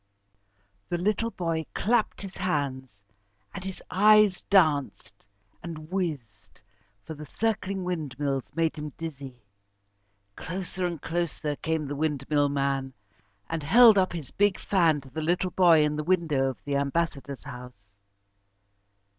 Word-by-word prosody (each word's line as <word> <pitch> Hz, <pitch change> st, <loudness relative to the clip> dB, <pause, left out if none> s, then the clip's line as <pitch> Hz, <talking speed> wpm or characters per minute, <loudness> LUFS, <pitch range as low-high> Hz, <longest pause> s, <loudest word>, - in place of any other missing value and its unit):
The 175 Hz, -, 0 dB
little 210 Hz, +5 st, 0 dB
boy 165 Hz, -6 st, -3 dB
clapped 220 Hz, -1 st, 0 dB
his 195 Hz, -1 st, -8 dB
hands, 140 Hz, -8 st, -2 dB, 0.6 s
and -, -, -7 dB
his 190 Hz, -1 st, -6 dB
eyes 210 Hz, 0 st, +5 dB
danced 155 Hz, -8 st, +1 dB, 0.4 s
and 160 Hz, -1 st, -8 dB
whizzed, 135 Hz, -, -4 dB, 0.4 s
for 160 Hz, -, -7 dB
the 150 Hz, 0 st, -10 dB
circling 200 Hz, -2 st, -2 dB
windmills 145 Hz, -6 st, -3 dB
made 165 Hz, -1 st, 0 dB
him 150 Hz, -2 st, -6 dB
dizzy. 135 Hz, -7 st, -8 dB, 0.9 s
Closer 180 Hz, 0 st, -3 dB
and 170 Hz, -3 st, -5 dB
closer 165 Hz, -2 st, -2 dB
came 160 Hz, +1 st, -2 dB
the 145 Hz, +1 st, -4 dB
windmill 145 Hz, -1 st, 0 dB
man, 135 Hz, -1 st, -1 dB, 0.5 s
and 165 Hz, -1 st, -3 dB
held 220 Hz, +7 st, +7 dB
up 185 Hz, -1 st, +1 dB
his 160 Hz, -6 st, -6 dB
big 205 Hz, -1 st, +2 dB
fan 165 Hz, -7 st, +2 dB
to 135 Hz, -, -15 dB
the 155 Hz, +4 st, -4 dB
little 175 Hz, +3 st, 0 dB
boy 170 Hz, -4 st, +5 dB
in 150 Hz, 0 st, 0 dB
the 155 Hz, -, -2 dB
window 160 Hz, -6 st, +1 dB
of 130 Hz, -, -6 dB
the 140 Hz, -1 st, 0 dB
Ambassador's 140 Hz, -2 st, -2 dB
house. 125 Hz, -5 st, -11 dB
160 Hz, 135 wpm, -27 LUFS, 140-185 Hz, 0.9 s, held